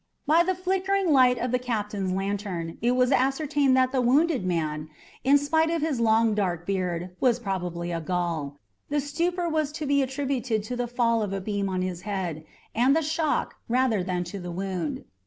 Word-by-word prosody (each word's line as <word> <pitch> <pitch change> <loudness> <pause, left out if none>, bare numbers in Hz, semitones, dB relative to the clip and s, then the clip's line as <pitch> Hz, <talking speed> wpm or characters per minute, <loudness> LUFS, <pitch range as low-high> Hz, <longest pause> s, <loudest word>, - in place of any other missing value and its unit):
By 320 +3 +5
the 370 +2 +1
flickering 380 0 0
light 250 -2 +5
of 245 - -2
the 250 - +2
captain's 210 -6 -2
lantern 195 -3 -3
it 240 +2 +2
was 250 +1 +3
ascertained 275 0 +2
that 255 0 +3
the 260 -1 +1
wounded 275 - +3
man, 155 -4 -2 0.3
in 275 +2 +6
spite 320 +3 +2
of 330 -2 -1
his 300 -6 0
long 225 -1 +3
dark 180 -5 -1
beard, 180 -2 -2
was 245 -3 +3
probably 180 -5 -3
a 165 -1 -2
Gaul. 165 -4 -2 0.3
The 290 0 +1
stupor 340 +5 -1
was 310 -3 0
to 310 -1 -4
be 280 0 +3
attributed 260 -4 -1
to 245 +4 -4
the 245 0 -2
fall 230 -1 +1
of 205 -2 -2
a 195 - -1
beam 200 0 -2
on 185 -1 -1
his 180 -2 -4
head, 180 -6 -3 0.3
and 255 +5 +3
the 325 - +2
shock, 315 0 -1
rather 245 -4 +2
than 180 -1 -1
to 180 +3 -7
the 175 -1 -6
wound. 180 -3 -3
230 Hz, 195 wpm, -26 LUFS, 185-285 Hz, 0.3 s, in